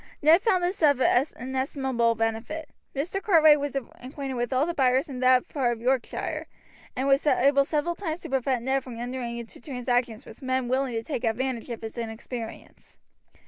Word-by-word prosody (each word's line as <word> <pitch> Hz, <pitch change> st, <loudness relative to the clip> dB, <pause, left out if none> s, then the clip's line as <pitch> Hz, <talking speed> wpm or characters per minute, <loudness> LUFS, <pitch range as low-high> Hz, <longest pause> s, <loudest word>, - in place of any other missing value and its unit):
Ned 325 Hz, +5 st, +7 dB
found 380 Hz, -6 st, +2 dB
this 360 Hz, +2 st, -1 dB
of 285 Hz, -4 st, +5 dB
inestimable 260 Hz, -2 st, +1 dB
benefit. 225 Hz, +8 st, -3 dB, 0.3 s
Mr. 340 Hz, +8 st, -2 dB
Cartwright 315 Hz, -7 st, +6 dB
was 285 Hz, -1 st, -3 dB
acquainted 270 Hz, +1 st, -5 dB
with 240 Hz, -1 st, -2 dB
all 260 Hz, +3 st, +2 dB
the 345 Hz, -, -2 dB
buyers 265 Hz, 0 st, +2 dB
in 265 Hz, -3 st, -6 dB
that 255 Hz, 0 st, +4 dB
part 255 Hz, -5 st, 0 dB
of 230 Hz, -, -8 dB
Yorkshire, 255 Hz, +1 st, -1 dB, 0.5 s
and 260 Hz, +2 st, -1 dB
was 275 Hz, +2 st, +3 dB
able 280 Hz, 0 st, +4 dB
several 300 Hz, +4 st, -1 dB
times 340 Hz, -2 st, -4 dB
to -, -, -7 dB
prevent 260 Hz, -2 st, 0 dB
Ned 265 Hz, 0 st, +1 dB
from 250 Hz, -3 st, -8 dB
entering 240 Hz, 0 st, -4 dB
into 235 Hz, 0 st, -9 dB
transactions 245 Hz, -3 st, -1 dB
with -, -, -13 dB
men 260 Hz, -1 st, -1 dB
willing 260 Hz, 0 st, 0 dB
to 225 Hz, 0 st, -2 dB
take 260 Hz, -4 st, -4 dB
advantage 245 Hz, +1 st, -1 dB
of 235 Hz, -1 st, -6 dB
his 225 Hz, +2 st, -6 dB
inexperience. 225 Hz, 0 st, -7 dB
260 Hz, 180 wpm, -26 LUFS, 240-285 Hz, 0.5 s, Ned